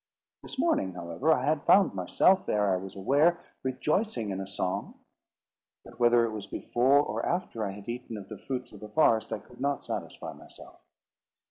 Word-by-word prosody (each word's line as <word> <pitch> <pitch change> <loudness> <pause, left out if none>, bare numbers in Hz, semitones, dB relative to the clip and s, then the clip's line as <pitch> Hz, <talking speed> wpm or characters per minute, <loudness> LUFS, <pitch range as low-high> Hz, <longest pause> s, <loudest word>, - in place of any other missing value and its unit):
This - - -9
morning, 260 - +1
however, 85 - 0
I 130 -4 +2
had 150 0 +1
found 195 - +5
myself, 100 - +3
ere 105 -2 +2
I - - +2
was 95 +1 -8
aware, 145 - +3 0.2
rejoicing 130 - -1
in 95 - -3
a 95 - -6
song; 95 -2 -3 0.9
but - - -14
whether 120 -1 +5
it 115 - -3
was 105 -2 -6
before 130 +4 +2
or - - -3
after 170 -10 -2
I 100 -2 -3
had 100 +2 -11
eaten 120 -1 -5
of 100 -2 -9
the 110 - -8
fruits 125 -2 -5
of - - -12
the 105 - -9
forest, 110 -5 +3
I 110 - -1
could 125 +4 -16
not 140 0 0
satisfy - - -5
myself. - - -13
120 Hz, 190 wpm, -29 LUFS, 100-145 Hz, 0.9 s, found